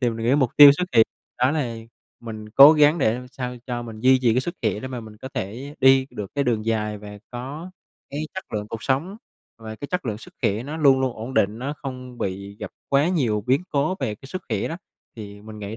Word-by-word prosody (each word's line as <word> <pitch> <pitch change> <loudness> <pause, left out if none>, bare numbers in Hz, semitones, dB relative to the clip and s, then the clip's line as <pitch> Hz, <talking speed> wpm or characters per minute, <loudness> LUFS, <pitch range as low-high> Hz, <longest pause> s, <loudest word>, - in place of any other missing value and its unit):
thì 120 -2 +2
mình 115 0 -4
nghĩ 130 - +4
mục 130 -5 +2
tiêu 145 -1 +11
xuất 180 +5 -1
hiện 110 - +7 0.3
đó 125 +2 +3
là 135 -7 -2 0.4
mình 110 -2 -8
cố 140 +7 +9
gắng 150 +2 +4
để 110 -5 +2
làm 125 +1 -8
sao 125 -1 -5
cho 120 -1 -3
mình 115 -2 -9
duy 130 +2 +5
trì 115 -2 +3
cái 125 - +3
sức 170 +6 -5
khỏe 105 -2 0
để 130 - -6
mà 125 -2 -5
mình 110 -1 -12
có 130 +4 -8
thể 125 +10 -5
đi 135 0 +5
được 100 +3 -7
cái 140 - +1
đường 115 -4 0
dài 105 -2 -1
và 105 0 -10
có 140 +8 -7 0.4
cái 145 - -4
chất 190 - -8
lượng 105 0 -3
cuộc 115 - -6
sống 160 +10 -1 0.4
và 110 -1 -8
cái 145 - -7
chất 180 -7 -3
lượng 105 -1 -3
sức - - -14
khỏe 105 +4 +1
nó 150 +4 -6
luôn 140 -4 +4
luôn 130 -2 0
ổn 120 +5 -6
định, 105 -1 +2
nó 140 +4 -4
không 125 -2 -7
bị 100 +1 -4
gặp - - -5 0.2
quá 140 +4 +3
nhiều 120 - 0
biến 135 +7 +2
cố 150 +6 0
về 105 - -1
cái 120 - -14
sức 185 +6 -6
khỏe 105 -4 -1
đó. 165 - -4 0.4
Thì 105 -1 -9
mình 110 0 -10
nghĩ 105 +1 -6
125 Hz, 250 wpm, -23 LUFS, 110-140 Hz, 0.4 s, tiêu